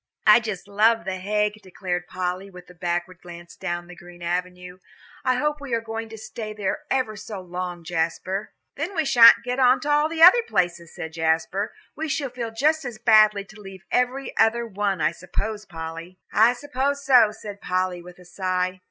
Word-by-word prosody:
"I 215 +2 +8
just 210 -5 -6
love 215 0 +2
The 190 -1 -3
Hague," 210 +2 -1
declared 180 -2 -4
Polly, 185 +1 -4
with 180 -2 -13
a - - -15
backward 175 0 -3
glance 175 -1 -11
down 175 0 -4
the 180 0 -12
green 175 0 -13
avenue. 180 +1 -4 0.4
"I 255 - +2
hope 295 +3 -1
we 270 -4 -2
are - - 0
going 225 0 -6
to 220 - -9
stay 215 0 -7
there 205 -3 -2
ever 255 -5 0
so 210 -1 -7
long, 180 -1 -6
Jasper." 175 +4 -2 0.3
"Then 335 +7 -4
we 320 -2 +1
sha'n't 235 -3 +8
get 250 +2 -3
on 255 0 +5
to 295 - -1
all 295 +1 +3
the 325 0 +2
other 370 +8 +9
places," 175 - -1
said 160 0 -7
Jasper. 160 +6 0 0.2
"We 315 +1 -4
shall 280 -3 -2
feel 240 -2 -4
just 300 +8 +1
as 245 -4 -6
badly 215 -2 +5
to 215 +1 -15
leave 195 -2 -11
every 250 +2 0
other 230 +1 +3
one, 200 -4 -2
I 150 - +3
suppose, 215 +5 -5
Polly." 165 +1 -8 0.2
"I 225 +3 +5
suppose 280 +1 -2
so," 250 -5 +6
said 205 -1 -10
Polly, 185 -1 -1
with 180 0 -13
a 180 - -16
sigh. 185 0 -2
205 Hz, 195 wpm, -24 LUFS, 180-240 Hz, 0.4 s, other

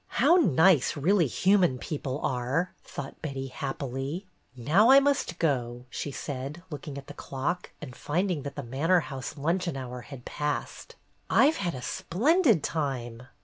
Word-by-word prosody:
"How - - +5
nice 165 - +4
really 170 +3 +3
human 180 - +3
people 140 0 -4
are!" 130 +8 -1
thought 135 -1 -8
Betty, 135 -3 -4
happily. 135 +6 -4 0.3
"Now 160 - +4
I 270 +1 +9
must 275 -11 0
go," 125 -6 -1
she - - -4
said, 140 +4 -6
looking 145 -1 -6
at 140 - -8
the 145 - -9
clock, 145 +5 -3
and 130 -5 -8
finding 175 0 -1
that 140 0 -6
the 145 - -5
manor 155 +9 +2
house 135 0 -6
luncheon 170 +1 -1
hour 125 -1 -6
had 125 -1 -11
passed. 150 -1 -4 0.3
"I 285 - +5
've - - -7
had 175 -5 -2
a 125 - -7
splendid 240 - +2
time." 125 -6 -3
145 Hz, 155 wpm, -28 LUFS, 130-180 Hz, 0.3 s, I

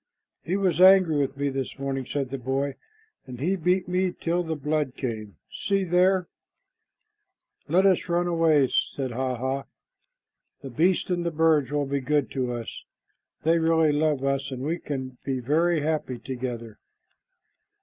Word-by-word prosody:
"He 180 +4 -1
was 180 -4 +1
angry 185 -4 +7
with 140 -1 -1
me 140 0 0
this 135 -1 -4
morning," 135 -2 -3
said 135 -3 -3
the 135 - -4
boy, 135 +3 -1 0.5
"and 125 -2 -8
he 175 +8 +1
beat 180 +1 +1
me 180 0 +1
till 175 0 -1
the 160 -2 -3
blood 150 -2 -1
came. 110 -6 -5 0.2
See 195 -1 -1
there!" 180 +1 +2 1.4
"Let 180 +6 +3
us 185 -2 +2
run 175 +1 +1
away," 165 -6 +3
said 135 -3 -1
Hah 130 +1 -2
hah. 130 +3 -2 1.0
"The 135 - -7
beasts 175 +7 +1
and 175 -1 0
the 170 - 0
birds 160 -3 +2
will 145 0 0
be 140 0 -2
good 145 +1 0
to 130 -2 -2
us. 120 -2 -6 0.6
They 165 +1 +3
really 160 -1 +3
love 145 -2 +1
us, 140 0 0
and 130 -1 -6
we 165 +4 -1
can 130 -3 -5
be 135 -2 -2
very 160 +6 +1
happy 150 -4 -2
together." 120 -2 -6
145 Hz, 160 wpm, -26 LUFS, 130-170 Hz, 1.4 s, angry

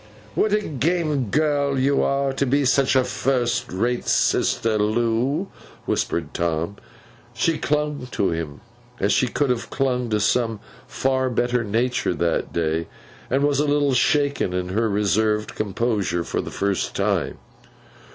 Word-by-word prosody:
'What 215 - +1
a 210 0 +2
game 155 - 0
girl 145 0 +1
you 140 +2 +2
are, 140 0 +1
to 140 - 0
be 140 +2 +2
such 135 +1 +3
a 130 - +5
first 125 -1 -1
rate 120 +6 -1
sister, 110 -2 +2
Loo!' 120 - 0 0.4
whispered 80 -3 -1
Tom. 85 +3 -1 0.6
She 160 +7 +1
clung 150 -3 -1
to 95 -6 0
him 80 -2 -4 0.4
as 100 +2 +2
she 130 - +3
should 140 +2 0
have 120 -2 -3
clung 125 -3 0
to 105 -1 +1
some 115 +1 +1 0.3
far 130 -1 0
better 120 0 0
nature 115 -2 0
that 85 0 -1
day, 80 0 -1 0.4
and 135 +2 +1
was 145 -1 +2
a 150 - +2
little 145 -1 +2
shaken 140 -5 +2
in 90 0 -2
her 110 +4 +1
reserved 105 +1 +1
composure 105 -4 -1
for - - -2
the - - -7
first 100 -1 -1
time. - - 0
125 Hz, 150 wpm, -23 LUFS, 105-140 Hz, 0.6 s, a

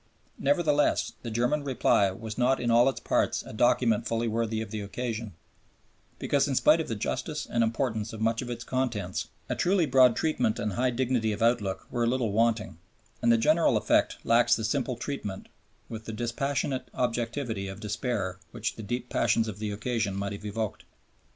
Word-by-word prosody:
Nevertheless, 145 0 +2
the 120 - -5
German 125 +6 0
reply 125 -7 +3
was 110 +3 -7
not 130 +2 +2
in 120 -1 0
all 120 +3 +6
its 135 - -4
parts - - 0
a - - -9
document 115 0 +2
fully 115 0 0
worthy 115 0 -1
of 110 - -5
the 110 -1 -3
occasion, 110 0 -4 0.8
because 140 0 +1
in 135 - -1
spite 155 +5 +5
of - - -5
the 115 - -2
justice 145 +8 -3
and 115 - +1
importance 115 -2 -1
of 110 - -8
much 115 +1 +1
of 125 - -6
its 120 -1 -5
contents, 115 -9 -2 0.2
a - - -1
truly 180 -1 +2
broad 130 -4 +5
treatment 125 -9 0
and 105 -1 -2
high 125 +5 +1
dignity 120 -2 0
of 105 +2 -2
outlook 110 -5 +1
were 120 - 0
a - - +1
little 120 -3 0
wanting, 110 -5 +1 0.4
and 120 -1 +4
the 115 - +5
general 155 +8 +3
effect - - +2
lacks 120 +1 +4
the 110 - -4
simple 125 +2 -1
treatment, 120 -6 -5 0.4
with 110 -1 -8
the 110 - -5
dispassionate 130 +3 -2
objectivity 120 -3 -2
of 95 0 -7
despair 105 -3 -2
which 110 - -4
the - - -6
deep 120 +3 -3
passions 115 -2 +1
of 105 -2 -6
the 105 -1 -2
occasion 105 -1 -2
might 100 0 -3
have 100 +1 -8
evoked. 105 0 -3
115 Hz, 190 wpm, -28 LUFS, 110-130 Hz, 0.8 s, all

